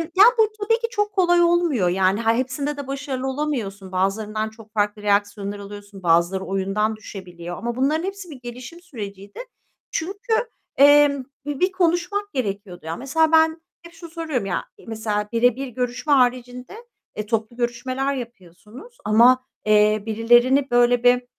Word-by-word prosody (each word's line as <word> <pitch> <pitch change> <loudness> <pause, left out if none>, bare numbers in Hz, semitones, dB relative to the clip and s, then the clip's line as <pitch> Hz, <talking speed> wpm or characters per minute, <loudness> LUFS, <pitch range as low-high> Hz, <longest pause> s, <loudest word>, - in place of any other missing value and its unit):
ya, 395 - +8
bu 440 -1 +5
tabii 455 +3 +2
ki 465 - -2
çok 415 -3 -1
kolay 350 -2 +3
olmuyor 340 - +2
yani. 190 +3 +1
Yani, 225 0 +2
eee, 235 - 0
hepsinde 280 +3 -3
de 280 -2 -6
başarılı 270 -1 -4
olamıyorsun. 235 -10 -3
Bazılarından 215 +3 -1
çok 220 -1 -17
farklı 210 0 -1
reaksiyonlar 205 0 -1
alıyorsun. 200 -1 -11
Bazıları 170 +3 +2
oyundan 195 +3 -1
düşebiliyor 180 -4 -9
ama 235 0 -4
bunların 300 +6 +1
hepsi 390 -2 -6
bir 275 -4 -10
gelişim 250 +8 -9
süreciydi. 205 - -9 0.5
Çünkü, 400 +8 -3 0.4
emm, 285 -1 +6 0.2
bir 290 -2 -4
bir 370 +1 +2
konuşmak 370 +3 -1
gerekiyordu 200 - -4
ya. 165 +1 -3
Mesela 315 +5 +1
ben 320 0 +4 0.2
hep 340 0 -14
şunu 335 0 -11
soruyorum 315 - -3
ya. 185 - -2 0.2
Mesela 210 -2 -2
birebir 245 +3 +1
görüşme 250 +4 -2
haricinde, 250 - 0 0.4
eee, 210 - -3
toplu 225 +1 -2
görüşmeler 255 +3 -2
yapıyorsunuz 235 - -11
ama, 245 +4 +5 0.2
eee, 210 0 +3
birilerini 240 +5 +3
böyle 245 0 +3
bir 245 0 +4
245 Hz, 150 wpm, -22 LUFS, 210-295 Hz, 0.5 s, ya